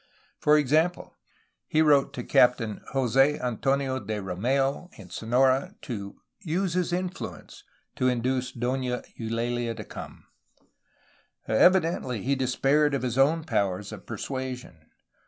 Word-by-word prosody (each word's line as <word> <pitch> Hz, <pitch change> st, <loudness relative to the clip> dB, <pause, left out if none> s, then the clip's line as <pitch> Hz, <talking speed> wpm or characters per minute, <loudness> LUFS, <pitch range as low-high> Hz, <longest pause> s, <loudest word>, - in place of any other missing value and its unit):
For 150 Hz, 0 st, +5 dB
example, 155 Hz, +5 st, +1 dB, 0.5 s
he 155 Hz, 0 st, +3 dB
wrote 145 Hz, -3 st, +4 dB
to 125 Hz, -, -5 dB
Captain 120 Hz, -4 st, +3 dB
Jose 135 Hz, +3 st, +3 dB
Antonio 130 Hz, +2 st, 0 dB
de 110 Hz, -4 st, -4 dB
Rom^u 130 Hz, -, -1 dB
in 95 Hz, -5 st, -13 dB
Sonora 130 Hz, +4 st, +1 dB
to 100 Hz, -7 st, -6 dB, 0.3 s
'^use 180 Hz, +1 st, -1 dB
his 180 Hz, -1 st, 0 dB
influence 180 Hz, +1 st, -5 dB, 0.2 s
'' -, -, -46 dB
to 130 Hz, -, +2 dB
induce 125 Hz, +1 st, 0 dB
Dona 125 Hz, 0 st, -2 dB, 0.2 s
EulaHa 115 Hz, +1 st, -2 dB
to -, -, -6 dB
come; -, -, -10 dB, 1.2 s
evidently 160 Hz, -, +3 dB
he 140 Hz, -, +1 dB
despaired 135 Hz, +3 st, +2 dB
of 135 Hz, -, -3 dB
his 125 Hz, 0 st, -1 dB
own 155 Hz, +4 st, +3 dB
powers 100 Hz, -, -1 dB
of -, -, -10 dB
persua 130 Hz, -1 st, -4 dB
sion. 80 Hz, -10 st, -16 dB
130 Hz, 130 wpm, -27 LUFS, 120-145 Hz, 1.2 s, For